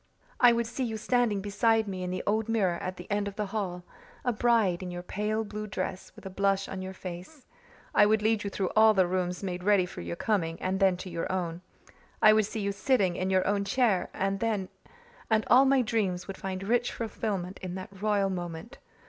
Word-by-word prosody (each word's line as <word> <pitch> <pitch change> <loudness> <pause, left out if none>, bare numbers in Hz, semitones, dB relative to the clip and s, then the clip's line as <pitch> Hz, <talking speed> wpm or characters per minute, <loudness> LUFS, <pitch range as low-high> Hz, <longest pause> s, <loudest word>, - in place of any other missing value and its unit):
I 245 -1 +7
would 235 0 +1
see 245 +3 -4
you 225 -3 -2
standing 225 -3 +1
beside 220 +2 +2
me 190 -2 -4
in 180 - -3
the 185 - -3
old 220 +2 0
mirror 190 -6 +1
at 185 0 -4
the 180 - -9
end 205 0 0
of 200 - -6
the 210 - -2
hall 190 -4 -4 0.4
a 245 - +2
bride, 215 -6 +2
in 185 - -5
your 175 0 -6
pale 210 +4 -2
blue 215 0 -6
dress, 185 -2 -4
with - - -14
a - - -4
blush 195 0 +1
on 190 -1 -5
your 190 0 -6
face. 185 - -9 0.5
I 205 - +6
would 215 0 +2
lead 220 -1 +2
you 200 - -2
through 195 -2 -2
all 220 0 +6
the 190 -1 +4
rooms 180 +1 -2
made 180 -2 -4
ready 200 -2 +4
for 180 - -8
your 85 0 -5
coming, 165 - -1
and 190 +1 -1
then 190 -2 +4
to 185 - -7
your 170 +1 -3
own. 175 -2 -3 0.6
I 215 - +7
would 215 -2 +3
see 220 - -4
you 200 0 0
sitting 200 -4 +1
in 185 +1 -1
your 190 -1 +2
own 200 0 +1
chair 210 -3 +1
and 195 +2 -2 1.0
all 260 +3 +6
my 270 -1 +4
dreams 200 -6 -1
would 195 - -6
find 190 0 -5
rich 240 +4 +1
fulfilment 200 -5 -4
in 185 -1 -6
that 190 +1 -9
royal 205 -2 +1
moment. 175 +7 -6
195 Hz, 215 wpm, -28 LUFS, 185-220 Hz, 1.0 s, I